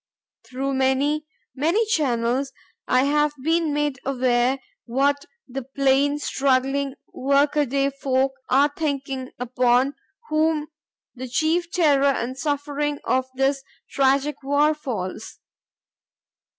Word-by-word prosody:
Through 270 +2 -3
many, 275 +3 +1 0.3
many 335 - +1
channels 265 - 0 0.4
I 255 +1 +3
have 295 +1 +2
been 325 0 +1
made 295 -2 -1
aware 255 -1 +1 0.3
what 280 +4 +1 0.2
the 270 +1 -5
plain, 275 +2 +1
struggling, 270 -1 0 0.2
workaday 280 0 +2
folk 270 -1 0 0.2
are 280 +2 +4
thinking 275 -4 -3
upon 250 +2 +2 0.4
whom 310 -1 +1 0.4
the 255 0 -7
chief 320 +7 0
terror 295 -7 +3
and 260 -2 0
suffering 290 +1 -2
of 260 0 +1
this 270 +1 +1 0.3
tragic 275 +2 +2
war 285 +3 +3
falls. 220 -9 -5
275 Hz, 105 wpm, -23 LUFS, 260-295 Hz, 0.4 s, are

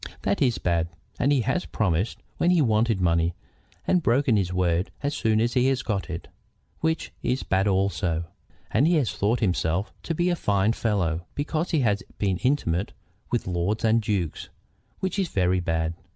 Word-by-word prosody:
That - - 0
is 125 -4 +3
bad. 85 -2 0 0.3
And 135 +4 +3
he 140 -3 +3
has 135 - -1
promised 95 0 -1
when 175 - +2
he 180 -1 +4
wanted 110 -5 +2
money, 85 -1 +2 0.5
and 180 - +3
broken 130 -3 +3
his 95 -3 +1
word 90 0 +1
as 145 +1 0
soon 110 -4 +1
as 120 +1 +1
he 125 +1 +3
had 135 -1 +1
got 100 -4 -2
it, 85 - -5 0.5
which 160 0 -1
is 125 +2 -1
bad 95 +1 +1
also. 95 -4 +1 0.5
And 135 +8 +3
he 175 - +4
has 140 -8 +2
thought 110 +5 0
himself 90 -1 0
to 165 - -3
be 175 +2 +2
a - - +1
fine 105 - +1
fellow 90 -8 -1
because 155 +3 -1
he 160 -4 +2
has 105 -4 +1 0.2
been 95 -3 0
intimate 100 - 0 0.4
with 120 - -1
lords 95 +5 -1
and 115 +1 +4
dukes, 100 -7 -2 0.5
which 190 +1 -1
is 190 - +1
very 95 - +1
bad. 80 -1 -1
105 Hz, 180 wpm, -25 LUFS, 90-130 Hz, 0.5 s, he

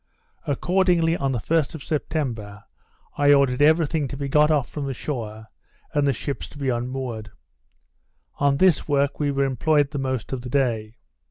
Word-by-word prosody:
Accordingly, 175 +2 +2
on 135 -4 -1
the 125 - -1
1st 160 +6 0
of 150 - -8
September, 120 -10 -3 0.6
I 145 0 +6
ordered 140 -2 +3
every 160 +2 +5
thing 150 -1 -1
to 140 - -7
be 140 0 -3
got 150 +2 +4
off 150 -5 +2
from 145 -2 -5
the 135 - -3
shore, 110 -6 -5 0.5
and 145 -1 +2
the - - +4
ships 140 +3 -4
to - - -15
be 140 -2 -1
unmoored. 120 -2 -3 1.1
On 140 -1 +3
this 185 -3 +3
work 140 -1 +1
we 145 -1 +1
were 140 0 +1
employed 140 +2 +1
the 145 - -3
most 130 -2 -3
of 130 - -3
the 125 - -7
day. 115 -5 0
140 Hz, 180 wpm, -23 LUFS, 125-150 Hz, 1.1 s, I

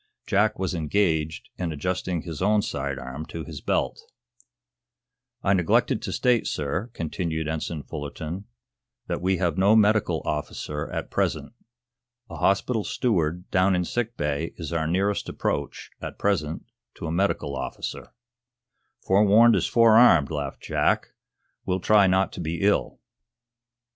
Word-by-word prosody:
Jack 105 +2 +2
was 95 -1 -2
engaged 80 -2 0
in 85 -2 -2
adjusting 90 +2 -2
his 80 -3 -6
own 105 +2 +3
side 70 - -3
arm 65 +4 -6
to 80 - -6
his - - -8
belt. - - -1 1.4
"I 95 - +3
neglected 90 -4 +2
to - - -4
state, 125 -3 +2
sir," 80 - -2
continued 80 -1 -3
Ensign 80 -1 -3
Fullerton, 80 +6 -6 0.6
"that 85 - -3
we 95 +1 +1
have 90 -1 0
no 100 +3 +5
medical 110 -1 +3
officer 75 0 -3
at - - -5
present. - - -1 0.8
A - - -6
hospital 105 +3 +1
steward 90 -8 -1
down 95 0 +3
in 90 0 0
sick 120 +4 -3
bay 75 +2 -2
is 85 -1 -5
our 80 -1 0
nearest 100 +4 0
approach, - - -3
at - - -6
present, 85 -6 -1 0.3
to - - -7
a 80 - -2
medical 95 +4 0
officer." - - -5 0.9
"Forewarned 105 +4 +6
is - - +1
forearmed," 115 - +6
laughed 75 -2 -4
Jack. - - +1 0.5
"We'll 95 0 -1
try 100 +1 +5
not 95 +1 +2
to - - -6
be 85 +2 -3
ill." 100 +1 +1
90 Hz, 140 wpm, -25 LUFS, 80-100 Hz, 1.4 s, Forewarned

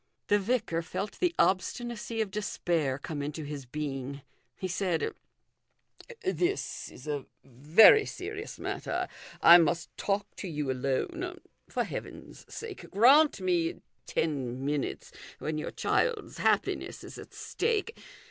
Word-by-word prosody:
The 205 - +5
vicar 205 -6 0
felt 185 +4 -5
the 355 -2 +1
obstinacy 225 +4 0
of 210 -3 -2
despair 170 -9 -1
come 145 +1 -5
into 150 +2 -4
his 145 -3 -6
being. 140 -1 -4 0.3
He 190 - -3
said 180 -2 -1 0.6
" 480 -2 -18
This 375 +1 -1
is 130 - -13
a 145 -2 -3 0.2
very 155 - +7
serious 410 +4 -6
matter; - - -3 0.4
I 170 +1 +11
must 170 0 0
talk 200 0 0
to 195 - -5
you 150 -5 -2
alone. 325 - -2 0.3
For - - 0
Heaven's - - -8
sake 450 -4 -7
grant 260 +4 +6
me 175 -3 +1 0.3
ten 135 -4 -1
minutes 145 -1 -2 0.3
when 155 0 -3
your - - -3
child's 465 -4 0
happiness - - 0
is - - -9
at - - -11
stake. 455 0 -1
180 Hz, 130 wpm, -30 LUFS, -, 0.6 s, I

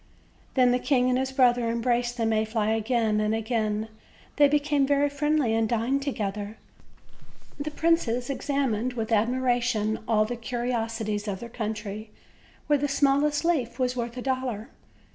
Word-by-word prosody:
Then 250 -2 +5
the 250 - +2
king 255 -2 +2
and 255 0 +2
his 265 0 -2
brother 245 -3 +3
embraced 240 +1 0
the 230 - 0
May 220 -1 +2
fly 220 -1 -1
again 225 -1 +1
and 215 +1 +1
again; 220 -1 -1 0.5
they 290 -1 +7
became 290 -1 +2
very 285 0 +2
friendly 295 -4 +1
and 225 -1 +1
dined 240 +4 0
together; 210 -5 -3 1.0
the 290 +2 -2
princes 295 -7 +1
examined 260 -4 -1
with 225 -2 -4
admiration 235 -1 +1
all 215 -2 +3
the 245 +3 -4
curiosities 225 -3 -3
of 195 -2 -3
their 235 - -8
country, 215 -2 -5 0.6
where 295 -1 +2
the 290 - 0
smallest 285 +2 +2
leaf 250 -9 0
was 255 -1 0
worth 235 0 -4
a 250 - -4
dollar. 255 -4 -2
240 Hz, 155 wpm, -26 LUFS, 220-270 Hz, 1.0 s, they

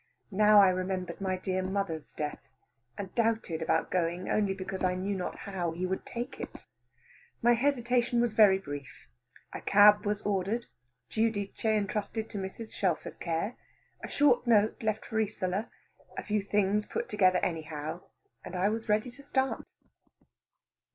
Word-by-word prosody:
Now 210 +1 +6
I 190 - +6
remembered 185 -1 -2
my 190 -1 0
dear 185 0 -1
mother's 185 -4 -3
death, 150 -1 -4 0.6
and 195 -2 -6
doubted 225 -8 0
about 160 0 +1
going 175 0 -1
only 200 -2 +1
because 190 0 -5
I 180 0 +2
knew 195 +2 -2
not 185 - -3
how 180 -4 -2
he 180 +2 -2
would 190 +1 -3
take 240 0 -5
it. - - -8 0.8
My 240 +1 +6
hesitation 245 -1 +1
was 240 -2 +1
very 205 -3 +6
brief. 145 -7 -8 0.5
A - - -5
cab 205 +1 +6
was 205 0 -1
ordered, 205 +4 -1 0.5
Giudice 220 -3 -1
entrusted 215 0 -1
to 205 - -4
Mrs. 195 +4 -6
Shelfer's 180 -5 -1
care, 170 +7 -2 0.5
a - - -4
short 255 -4 +3
note 215 -2 +3
left 215 -1 -1
for 220 - -2
Isola, 205 0 -1 0.5
a - - -3
few 210 -1 0
things 205 +1 +1
put - - -3
together 185 -3 +3
anyhow, 160 -1 -4 0.4
and 185 - -7
I 185 +3 +2
was 225 +1 -4
ready 215 +4 +1
to 280 +3 -14
start. 265 -1 -1
200 Hz, 155 wpm, -30 LUFS, 185-220 Hz, 0.8 s, Now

